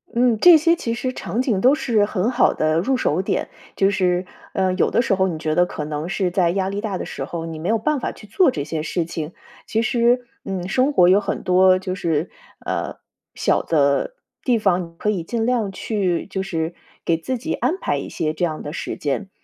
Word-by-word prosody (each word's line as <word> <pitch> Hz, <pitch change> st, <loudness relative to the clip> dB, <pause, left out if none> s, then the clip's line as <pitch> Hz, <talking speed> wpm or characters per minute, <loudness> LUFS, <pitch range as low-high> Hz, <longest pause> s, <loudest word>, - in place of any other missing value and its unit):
嗯， 240 Hz, -2 st, +3 dB
这 350 Hz, +3 st, +9 dB
些 330 Hz, +2 st, +3 dB
其 230 Hz, -8 st, -3 dB
实 255 Hz, +2 st, -3 dB
场 240 Hz, -, -2 dB
景 225 Hz, -7 st, 0 dB
都 260 Hz, +6 st, +5 dB
是 225 Hz, -8 st, +2 dB
很 210 Hz, +3 st, -1 dB
好 250 Hz, -, +3 dB
的 155 Hz, +1 st, +1 dB
入 260 Hz, +9 st, +1 dB
手 175 Hz, -6 st, +1 dB
点， 190 Hz, -, -2 dB, 0.3 s
就 195 Hz, 0 st, +3 dB
是， 180 Hz, -2 st, +1 dB, 0.3 s
呃， 190 Hz, -1 st, +1 dB
有 185 Hz, -, +2 dB
的 235 Hz, -, +2 dB
时 205 Hz, -, +1 dB
候 190 Hz, 0 st, +2 dB
你 165 Hz, -4 st, -3 dB
觉 155 Hz, 0 st, -1 dB
得 175 Hz, +3 st, +4 dB
可 150 Hz, -, -5 dB
能 150 Hz, +2 st, -4 dB
是 180 Hz, 0 st, 0 dB
在 180 Hz, -2 st, +2 dB
压 190 Hz, +1 st, 0 dB
力 200 Hz, +1 st, -3 dB
大 205 Hz, -4 st, -3 dB
的 -, -, -5 dB
时 135 Hz, -, -5 dB
候， 165 Hz, +2 st, -5 dB
你 165 Hz, -1 st, -6 dB
没 170 Hz, -, -3 dB
有 225 Hz, -, +3 dB
办 285 Hz, +6 st, 0 dB
法 -, -, -3 dB
去 -, -, -14 dB
做 285 Hz, -, +3 dB
这 145 Hz, -, -2 dB
些 155 Hz, +1 st, -3 dB
事 165 Hz, +1 st, -2 dB
情。 160 Hz, 0 st, -5 dB, 0.3 s
其 225 Hz, +1 st, 0 dB
实， 240 Hz, +1 st, +2 dB, 0.2 s
嗯， 185 Hz, -2 st, -3 dB
生 255 Hz, +8 st, +2 dB
活 175 Hz, -6 st, +6 dB
有 190 Hz, +2 st, +6 dB
很 205 Hz, -, -3 dB
多 185 Hz, 0 st, +5 dB
就 185 Hz, 0 st, -4 dB
是， 165 Hz, -3 st, -1 dB, 0.3 s
呃， -, -, -2 dB, 0.4 s
小 -, -, +1 dB
的 145 Hz, -, +1 dB, 0.3 s
地 245 Hz, -3 st, +2 dB
方， 190 Hz, -4 st, +2 dB
你 165 Hz, -, -23 dB
可 210 Hz, -, 0 dB
以 185 Hz, -5 st, -2 dB
尽 225 Hz, +6 st, -2 dB
量 235 Hz, -5 st, 0 dB
去， 190 Hz, -3 st, -1 dB
就 190 Hz, -1 st, -4 dB
是 165 Hz, -3 st, -3 dB, 0.3 s
给 170 Hz, -, +3 dB
自 240 Hz, +11 st, -3 dB
己 320 Hz, +8 st, -3 dB
安 365 Hz, -, 0 dB
排 -, -, -1 dB
一 -, -, -6 dB
些 155 Hz, -1 st, -2 dB
这 160 Hz, -, -4 dB
样 155 Hz, -2 st, -4 dB
的 145 Hz, -, -6 dB
时 -, -, -4 dB
间， 150 Hz, +8 st, -2 dB
190 Hz, 250 characters per minute, -21 LUFS, 170-230 Hz, 0.4 s, 这